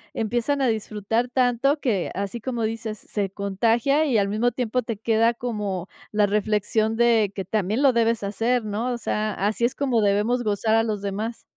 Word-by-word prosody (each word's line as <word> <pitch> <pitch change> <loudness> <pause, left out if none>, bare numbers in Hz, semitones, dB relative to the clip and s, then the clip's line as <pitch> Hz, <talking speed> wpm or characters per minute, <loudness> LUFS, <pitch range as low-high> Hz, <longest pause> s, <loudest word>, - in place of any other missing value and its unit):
empiezan 240 +5 0
a - - +3
disfrutar 220 +1 -1
tanto 255 +3 +2
que, 215 -10 0
así 200 +4 -4
como 240 -1 -3
dices, 220 -1 -3
se 200 -1 -3
contagia 225 +10 +1
y, 260 -7 +2
al 200 -1 +2
mismo 215 +4 +1
tiempo, 250 0 -1
te 230 -3 -5
queda 230 +1 +2
como 205 -7 -3 0.2
la 210 -1 +3
reflexión 210 +2 0
de 225 -3 +3
que 195 - -4
también 215 +6 0
lo 270 -2 +5
debes 230 -2 +1
hacer, 225 +4 0
¿no? 215 +4 -2
O 240 - -3
sea, 215 -2 -2
así 210 +4 -1
es 240 - +2
como 260 -5 +1
debemos 210 +4 +2
gozar 215 +1 0
a 225 - +5
los 215 -3 -3
demás. 210 +4 -4
225 Hz, 185 wpm, -24 LUFS, 205-240 Hz, 0.2 s, lo